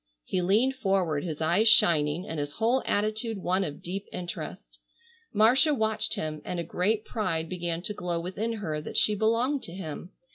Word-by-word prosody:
He 185 - -1
leaned 215 +9 +3
forward, 190 - +1
his 160 -3 -5
eyes 185 +8 +4
shining 165 -3 +4
and 160 - -4
his 145 0 -3
whole 235 +4 +2
attitude 215 +2 0
one 185 +1 0
of 145 -5 -6
deep 195 +3 -4
interest. 175 -1 -7 0.5
Marcia 255 +8 +5
watched 220 -2 0
him, 155 -1 -4
and 180 - -4
a - - -1
great 205 +6 0
pride 170 -8 -2
began 175 -1 -3
to 210 - -2
glow 175 -3 -3
within 195 +7 -3
her 160 -9 -3
that - - -5
she 210 - +4
belonged 230 +7 +1
to 170 - -8
him. 175 -1 -6
190 Hz, 180 wpm, -28 LUFS, 170-220 Hz, 0.5 s, Marcia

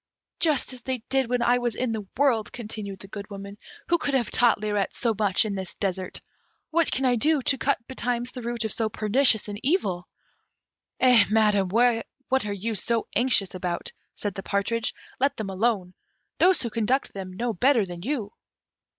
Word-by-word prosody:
"Just 300 -5 +2
as 250 - -10
they 255 -2 -3
did 265 -3 +1
when 245 -1 +1
I 245 +1 +4
was 240 -3 -1
in 255 -2 -1
the 215 -3 -4
world," 250 -6 +2
continued 210 -4 -6
the 195 - -9
Good 200 0 -7
Woman; 200 0 -8 0.3
"who 345 0 +3
could 285 -3 0
have 245 -4 0
taught 240 -3 +4
Lirette 210 -2 -1
so 230 -2 +1
much 205 +1 +3
in 210 - -2
this 190 -3 -5
desert? 190 -2 -2 0.5
What 335 0 +2
can 265 - 0
I 250 -1 +4
do 300 +6 +3
to 270 - +2
cut 280 - +2
betimes 245 -1 -2
the 255 - -7
root 235 -1 -2
of 220 - -1
so 225 -1 0
pernicious 220 +2 +2
an 205 +1 -7
evil?" 200 - 0 0.9
"Eh, 250 -5 +6
Madam, 210 -3 +3
what 245 +3 +1
are - - -2
you 205 +3 -2
so 225 +3 0
anxious 225 -5 +2
about?" 180 -2 -3 0.2
said 205 -2 -3
the 195 - -5
partridge; 220 +4 0 0.2
"let 275 +2 +1
them 205 -3 -4
alone 190 -2 0 0.5
those 365 -3 +4
who 235 - -3
conduct 240 +5 0
them 190 -2 -6
know 235 +4 -2
better 245 +2 +3
than 175 -2 -8
you." 225 -2 -3
225 Hz, 190 wpm, -26 LUFS, 200-250 Hz, 0.9 s, Eh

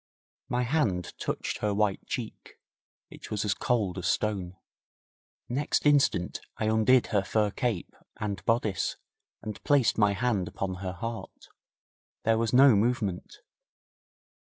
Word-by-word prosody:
My 125 0 +1
hand 120 - 0
touched - - -3
her 105 -1 0
white 105 -2 0
cheek. - - -6 0.6
It - - -11
was 105 0 -2
as 105 - +2
cold 100 -7 0
as 90 - -3
stone. 95 -4 -1 0.9
Next 140 +5 -1
instant 140 -11 +2 0.2
I 110 - -1
undid 110 +3 +4
her 100 - +4
fur 105 +1 +1
cape 115 -6 -2 0.3
and 100 -4 -3
bodice, 110 -5 0 0.5
and 105 -2 -7
placed 140 -7 +3
my 105 -1 +4
hand 105 -4 0
upon 95 -2 -4
her 95 -1 -3
heart. 115 +6 -7 0.7
There 110 0 +3
was 115 -1 0
no 130 -1 +7
movement. 105 -4 -1
110 Hz, 135 wpm, -28 LUFS, 100-120 Hz, 0.9 s, no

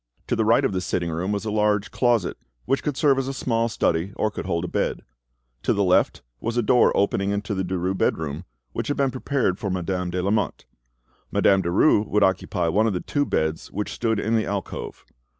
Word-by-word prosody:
To - - 0
the 110 - +1
right 115 +2 +4
of - - +1
the 95 -1 -1
sitting 85 -2 -2
room 90 +5 -2
was 100 0 -2
a 110 - -2
large 105 -2 +1
closet, 120 -7 +1 0.3
which 135 +1 +1
could 145 -3 -3
serve 140 -3 +3
as 135 - -2
a 135 - -3
small 115 -3 0
study 85 -2 0
or 110 - 0
could 95 - -6
hold 85 -1 -1
a - - -3
bed; - - -2 0.6
to - - +1
the 100 - +1
left 90 -8 +2 0.2
was 115 +1 -3
a 120 - +2
door 125 +3 +4
opening 100 0 +1
into 100 +1 -2
the 95 -1 -1
Derues' 95 +1 -2
bedroom, 80 +2 -1 0.3
which - - -3
had 145 - -1
been 135 -2 +2
prepared 130 -7 -1
for 105 -3 -3
Madame 90 0 -2
de 90 +1 -2
Lamotte. 105 +2 -1 0.7
Madame 95 -1 +4
Derues 100 - +3
would 105 0 +2
occupy 95 -2 +1
one 105 +7 +2
of 110 - 0
the 90 - -1
two 145 +7 -1
beds 80 0 -1
which 105 +2 -3
stood 110 -3 0
in 110 +2 0
the 110 - +1
alcove. 100 -3 -5
100 Hz, 220 wpm, -24 LUFS, 90-115 Hz, 0.7 s, right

